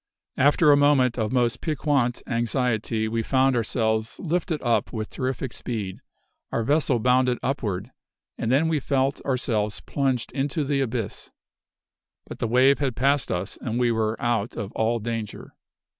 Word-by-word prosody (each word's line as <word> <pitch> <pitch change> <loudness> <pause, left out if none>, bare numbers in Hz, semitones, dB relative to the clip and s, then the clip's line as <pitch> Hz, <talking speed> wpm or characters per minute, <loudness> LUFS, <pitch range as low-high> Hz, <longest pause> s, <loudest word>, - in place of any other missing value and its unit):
After 145 +3 +5
a - - +7
moment 135 -4 +3
of 110 0 -1
most 125 -1 +1
piquant 140 -5 0
anxiety, 115 -2 0
we 115 +1 -1
found 130 +3 +2
ourselves 110 -1 0
lifted 170 -1 -1
up 120 -2 +1
with 110 -2 -5
terrific 130 -1 -3
speed; 105 -6 -4 0.5
our 115 - 0
vessel 145 0 +2
bounded 125 +1 +2
upward, 115 -5 -2 0.4
and 115 - -2
then 145 +5 +3
we 160 -2 +1
felt 135 0 0
ourselves 115 -6 -1
plunged 135 -4 -1
into 145 +3 -1
the 140 0 0
abyss. 115 -5 -3 1.0
But - - -9
the - - 0
wave 130 +4 +4
had 135 -5 -1
passed 140 +2 +1
us 90 +2 -3
and 120 0 -2
we 120 -1 +3
were 110 -1 -1
out 120 -2 -1
of 100 0 -4
all 115 +1 0
danger. 115 -1 -5
125 Hz, 155 wpm, -25 LUFS, 115-135 Hz, 1.0 s, a